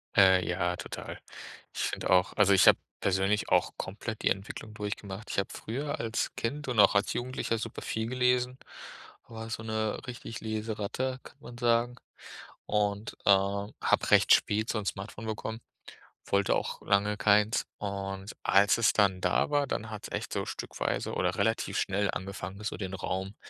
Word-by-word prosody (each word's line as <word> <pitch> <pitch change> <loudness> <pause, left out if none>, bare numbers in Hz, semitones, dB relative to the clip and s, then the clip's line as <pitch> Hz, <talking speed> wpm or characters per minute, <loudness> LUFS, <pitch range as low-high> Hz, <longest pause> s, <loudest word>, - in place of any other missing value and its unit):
Äh, 95 -2 +6
ja, 90 0 0
total. - - -7 0.5
Ich - - -3
finde - - -2
auch 90 +1 +4
also, 100 -1 +5
ich 95 - +6
habe - - +8 0.2
persönlich 95 +2 +1
auch - - +3
komplett 110 +3 -5
die - - +4
Entwicklung 100 +2 -4
durchgemacht. 105 0 -6
Ich - - -4
habe 100 - -1
früher 140 +6 -4
als 115 0 -1
Kind 145 +5 -3
und 120 -4 0
auch 100 - +7
als 100 - +2
Jugendlicher 120 -2 -2
super 115 +1 -5
viel 110 0 -2
gelesen, 125 0 +1 0.7
war 115 -1 -8
so 110 - -4
'ne 110 -1 -1
richtig 115 -2 -7
Leseratte, 110 +4 -3
kann - - -14
man 120 0 -10
sagen. 120 0 +2 0.7
Und, 105 0 -1
äh, - - +2
habe 100 +1 +2
recht - - +7
spät 110 +2 +2
so 110 - 0
'n 100 - -6
Smartphone 105 +3 -5
bekommen, 110 +1 -4 0.6
wollte 100 0 +2
auch - - -3
lange 105 +1 +2
keins. 105 +3 +3
Und 100 -1 -4
als 100 +3 +5
es 115 0 +4
dann 100 -3 +3
da 90 - +2
war, 145 -1 +2
dann 110 -3 -3
hat's 105 - -7
echt - - -4
so - - -1
stückweise - - -3
oder 90 0 0
relativ 110 +3 0
schnell 100 +1 0
angefangen, 95 +1 -6
so - - -3
den 95 -3 -5
Raum, 95 +1 -3
105 Hz, 170 wpm, -29 LUFS, 100-115 Hz, 0.7 s, habe